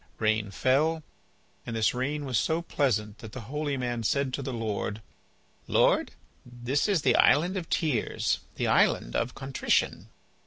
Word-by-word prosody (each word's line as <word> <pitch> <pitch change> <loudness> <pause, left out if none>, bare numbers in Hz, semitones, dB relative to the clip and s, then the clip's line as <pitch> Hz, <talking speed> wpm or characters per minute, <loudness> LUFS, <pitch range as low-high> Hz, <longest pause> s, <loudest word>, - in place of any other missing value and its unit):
Rain 110 -1 +1
fell, 150 +10 +1 0.6
and 115 - -5
this 110 -1 +2
rain 140 +4 -2
was 130 -4 +1
so 165 +1 0
pleasant 105 -10 -1
that 110 -2 -10
the 130 - -6
holy 145 +4 -3
man 120 -2 -2
said 135 +3 0
to 140 - -2
the 135 - -4
Lord: 110 -3 -3 0.7
"Lord, - - +3 0.3
this 125 - -1
is 190 -7 +1
the - - +4
island 175 +6 +4
of 180 -4 -4
tears, 150 -9 0 0.2
the - - -1
island - - +2
of 120 +2 -1
contrition." 135 0 0
130 Hz, 155 wpm, -28 LUFS, 115-145 Hz, 0.7 s, the